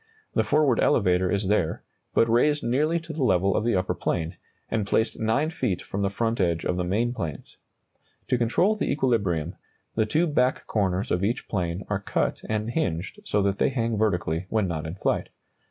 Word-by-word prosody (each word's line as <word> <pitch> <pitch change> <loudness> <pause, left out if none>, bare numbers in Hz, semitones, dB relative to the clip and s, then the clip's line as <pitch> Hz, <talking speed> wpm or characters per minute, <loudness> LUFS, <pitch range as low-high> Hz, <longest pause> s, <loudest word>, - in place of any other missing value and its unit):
The - - +2
forward 145 -6 +3
elevator 90 -3 +3
is 100 -1 0
there, 95 -5 0 0.3
but 115 - +5
raised 145 +6 +3
nearly 150 +8 +1
to 165 -1 -7
the 150 -3 -1
level 95 -3 +3
of - - +1
the 120 -2 +1
upper 95 0 0
plane, 80 -1 -2 0.3
and 110 -3 -1
placed 110 +3 +1
9 115 +8 +1
feet 95 - -2
from 100 - -4
the 100 - +1
front 115 +2 -1
edge 85 -2 0
of 90 - 0
the 90 - -1
main 110 +7 0
planes. 85 - -6 0.7
To 125 - +3
control 175 - +2
the 215 - -1
equilibrium, 100 - 0 0.4
the 110 -1 +1
two 160 +10 +2
back 130 -5 +1
corners 95 0 0
of 90 +2 +1
each 115 +5 -1
plane 90 -1 -2
are 105 -2 -1
cut 100 - -1
and 110 +1 -1
hinged 90 - -2
so 105 - +1
that 100 0 0
they - - +3
hang 115 -4 -1
vertically 90 -5 0
when 110 -3 +1
not 80 -2 -3
in 80 - -5
flight. - - -1
105 Hz, 195 wpm, -26 LUFS, 90-120 Hz, 0.7 s, but